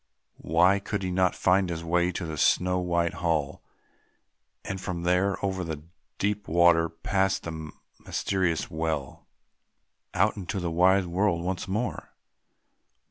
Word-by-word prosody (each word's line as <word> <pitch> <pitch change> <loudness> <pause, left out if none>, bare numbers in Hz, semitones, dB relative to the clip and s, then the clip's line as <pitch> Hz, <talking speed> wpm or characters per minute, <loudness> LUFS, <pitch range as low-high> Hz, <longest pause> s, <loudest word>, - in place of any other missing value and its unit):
Why 90 +6 +3
could 100 0 -4
he 90 - -2
not 90 0 +2
find 95 0 +2
his 85 -1 -4
way 85 +1 +1
to 90 0 -4
the 80 -1 -5
snow 90 +4 +2
white 85 -1 0
hall, 80 -5 -1 1.0
and 95 0 -4
from 85 -3 -4
there, 95 +2 +2
over 95 -1 -2
the 80 -3 -5 0.3
deep 105 +1 -1
water, 85 0 +4
past 95 +4 0
the 80 -2 -6 0.3
mysterious 95 -5 -1
well, 80 -3 -3 0.9
out 105 +4 +3
into 95 0 -4
the 85 -2 -2
wide 95 +3 +4
world 90 0 0
once 90 0 -3
more? 110 +6 -3
90 Hz, 135 wpm, -27 LUFS, 85-95 Hz, 1.0 s, water